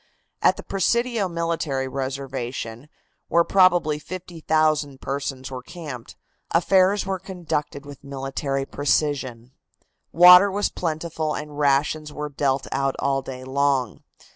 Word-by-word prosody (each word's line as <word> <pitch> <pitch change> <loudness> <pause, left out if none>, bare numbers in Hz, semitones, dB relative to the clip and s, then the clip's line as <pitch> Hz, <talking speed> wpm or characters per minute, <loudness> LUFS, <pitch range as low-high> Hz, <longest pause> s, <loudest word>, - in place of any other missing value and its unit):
At - - +4
the - - -8
Presidio 230 +1 0
military 165 -5 -2
reservation, 130 -2 -5 0.4
where 170 0 +4
probably 175 -5 +3
50,000 155 -5 -1
persons 135 -1 -4
were 130 -1 -5
camped, 140 -5 -9 0.3
affairs 190 +3 +3
were 190 -1 -2
conducted 165 -6 -4
with 145 -1 -11
military 135 0 -3
precision. 135 -4 -1 0.6
Water 180 +3 +8
was 205 +1 0
plentiful 160 -2 -3
and 150 -1 -7
rations 150 +2 +1
were 150 0 -5
dealt 135 -1 0
out 135 0 0
all 135 0 0
day 130 -1 -8
long. 135 -3 0
145 Hz, 115 wpm, -23 LUFS, 135-170 Hz, 0.6 s, Water